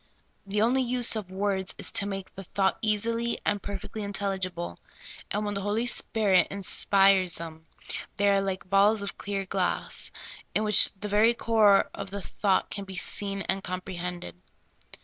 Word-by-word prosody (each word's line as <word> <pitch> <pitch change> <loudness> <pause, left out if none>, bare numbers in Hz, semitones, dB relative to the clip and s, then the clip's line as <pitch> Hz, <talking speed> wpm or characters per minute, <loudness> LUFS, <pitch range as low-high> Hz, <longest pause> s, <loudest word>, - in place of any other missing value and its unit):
The 205 +2 +1
only 255 +3 +2
use 245 -2 +3
of 210 -4 -5
words 190 0 -2
is - - 0
to 200 - -1
make 195 -1 -6
the 195 - -9
thought 190 +1 0
easily 230 +2 0
and 205 -1 0
per 200 +1 -4
fectly 215 +2 -8
intelligible, 190 - -4 0.5
and 210 +1 -2
when 205 - -2
the 200 - -3
Holy 210 +4 -1
Spirit 205 -6 +2
inspires 195 -2 +2
them, 160 -1 -9 0.5
they 205 - +1
are 200 0 +3
like 190 -1 -4
balls 200 +2 +3
of 200 - -7
clear 200 -1 -3
glass, - - -1 0.5
in 215 - +2
which 210 -1 +8
the 210 +2 -6
ver}^ 220 +3 +3
core 215 -4 +3
of 200 -1 -7
the 200 0 -6
thought 195 -3 0
can 200 - -5
be 190 0 -9
seen 195 +2 0
and 195 0 -2
compre 185 0 -5
hended. 175 - -6
200 Hz, 170 wpm, -27 LUFS, 190-210 Hz, 0.5 s, which